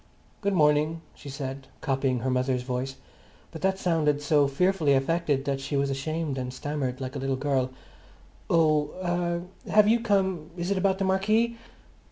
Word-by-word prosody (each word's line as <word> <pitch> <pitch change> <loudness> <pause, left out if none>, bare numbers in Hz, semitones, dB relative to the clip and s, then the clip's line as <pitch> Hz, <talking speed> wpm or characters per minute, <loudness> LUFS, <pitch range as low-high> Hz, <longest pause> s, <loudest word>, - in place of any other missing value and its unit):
"Good 200 -2 +1
morning," 155 +1 +3
she 145 - -11
said, 135 -1 -6
copying 135 -2 0
her 130 +2 0
mother's 125 0 0
voice. 130 +1 -3 0.6
But 160 - -8
that 190 0 +1
sounded 160 -5 +1
so 145 -1 +3
fearfully 160 +1 +2
affected 145 0 +1
that 135 -1 -1
she 140 +1 -2
was 140 0 +1
ashamed, 145 +1 -2
and 125 0 -4
stammered 130 -1 -3
like 130 +1 -5
a - - -2
little 135 0 -1
girl, 130 -1 0 0.8
"Oh—er—have 175 +5 +1
you 230 +2 +4
come—is 190 -5 -1
it 200 - +1
about 190 0 +2
the 195 - 0
marquee?" 215 +5 +2
150 Hz, 155 wpm, -27 LUFS, 135-180 Hz, 0.8 s, you